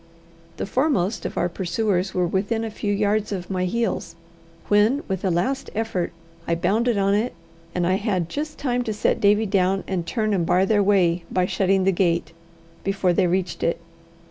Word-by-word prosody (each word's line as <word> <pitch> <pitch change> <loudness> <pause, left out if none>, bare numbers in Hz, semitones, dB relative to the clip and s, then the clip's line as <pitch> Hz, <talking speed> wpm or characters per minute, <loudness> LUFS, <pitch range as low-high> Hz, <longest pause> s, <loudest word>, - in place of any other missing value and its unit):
The - - -2
foremost 230 - 0
of - - -9
our 175 - +2
pursuers 185 +1 -1
were 180 -1 +1
within 200 +6 -1
a 225 - -4
few 205 -1 -2
yards 210 +1 +1
of 185 -2 -4
my 185 -1 0
heels, 230 +5 -2 0.5
when, 215 +7 +3
with 190 -2 -3
a 190 - +2
last 190 +11 -1
effort, 220 -5 -1 0.4
I 170 - +2
bounded 215 +7 +1
on 195 0 +2
it; 215 +2 0 0.4
and 180 -1 +1
I 185 +2 +2
had 195 -5 -1
just 300 - -4
time 250 -3 0
to 220 - -1
set 210 - 0
Davie 210 +2 +4
down 190 -1 +1
and 185 -3 -1
turn 215 -1 0
and 185 -4 +1
bar 180 +3 +3
their 205 0 +3
way 180 -4 +3
by 185 -1 +1
shutting 190 0 +1
the 195 - +3
gate, 170 -3 0 0.5
before 195 -2 +1
they 180 - +3
reached 180 0 -1
it. 170 - 0
195 Hz, 190 wpm, -23 LUFS, 180-215 Hz, 0.5 s, Davie